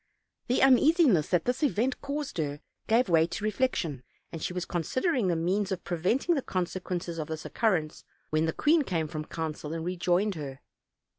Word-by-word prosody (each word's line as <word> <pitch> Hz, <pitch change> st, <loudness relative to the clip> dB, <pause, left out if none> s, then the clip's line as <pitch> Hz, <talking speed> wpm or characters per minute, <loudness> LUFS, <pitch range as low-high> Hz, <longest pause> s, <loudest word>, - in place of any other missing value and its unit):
The 250 Hz, -, +2 dB
uneasiness 270 Hz, -, +5 dB
that 175 Hz, -3 st, +1 dB
this 250 Hz, +3 st, -1 dB
event 260 Hz, -3 st, +1 dB
caused 285 Hz, -, -4 dB
her 145 Hz, -2 st, -2 dB, 0.3 s
gave 230 Hz, +2 st, +3 dB
way 165 Hz, -2 st, +4 dB
to 170 Hz, +4 st, -5 dB
reflec 255 Hz, +4 st, +1 dB
tion, 145 Hz, -7 st, -3 dB, 0.3 s
and 165 Hz, -, -6 dB
she -, -, -2 dB
was 180 Hz, -1 st, -3 dB
considering 245 Hz, -, 0 dB
the 175 Hz, -, +2 dB
means 190 Hz, +5 st, 0 dB
of 185 Hz, -2 st, -3 dB
preventing 190 Hz, -, +1 dB
the 285 Hz, -, 0 dB
consequences 180 Hz, -3 st, -3 dB
of 155 Hz, -, -3 dB
this 160 Hz, -1 st, -5 dB
occurrence, 175 Hz, -9 st, 0 dB, 0.3 s
when 155 Hz, +1 st, +2 dB
the -, -, +1 dB
queen 310 Hz, -, +3 dB
came 165 Hz, -, -1 dB
from 155 Hz, -1 st, -5 dB
council 155 Hz, -1 st, -5 dB
and 165 Hz, 0 st, -4 dB
rejoined 180 Hz, +3 st, +1 dB
her. 140 Hz, -5 st, -7 dB
180 Hz, 180 wpm, -28 LUFS, 160-250 Hz, 0.3 s, uneasiness